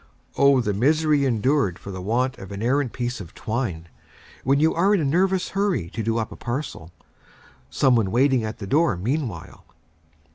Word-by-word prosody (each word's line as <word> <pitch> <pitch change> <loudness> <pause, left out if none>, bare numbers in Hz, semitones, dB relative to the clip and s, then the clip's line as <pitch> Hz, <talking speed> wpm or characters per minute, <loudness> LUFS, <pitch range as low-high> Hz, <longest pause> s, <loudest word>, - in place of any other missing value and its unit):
O 140 -2 +4
the 105 -4 -1
misery 150 +5 +2
endured 125 - +1
for 100 - -9
the 95 -1 -6
want 125 +6 -1
of 95 - -10
an 100 +2 -5
errant 130 +1 +1
piece 120 -2 -4
of 85 -3 -12
twine, 110 -8 -3 0.6
when 135 +2 +2
you 160 +2 +3
are 195 +5 +3
in - - +1
a 155 - 0
nervous 185 +5 +1
hurry 190 - -1
to 115 - -4
do 115 +1 -1
up 110 -2 -2
a - - -8
parcel, 120 - -5 0.8
some 125 - +3
one 110 -5 +1
waiting 130 +2 +2
at 110 0 -5
the 100 - -7
door 150 - +2
meanwhile! 115 - -4
125 Hz, 185 wpm, -23 LUFS, 105-145 Hz, 0.8 s, O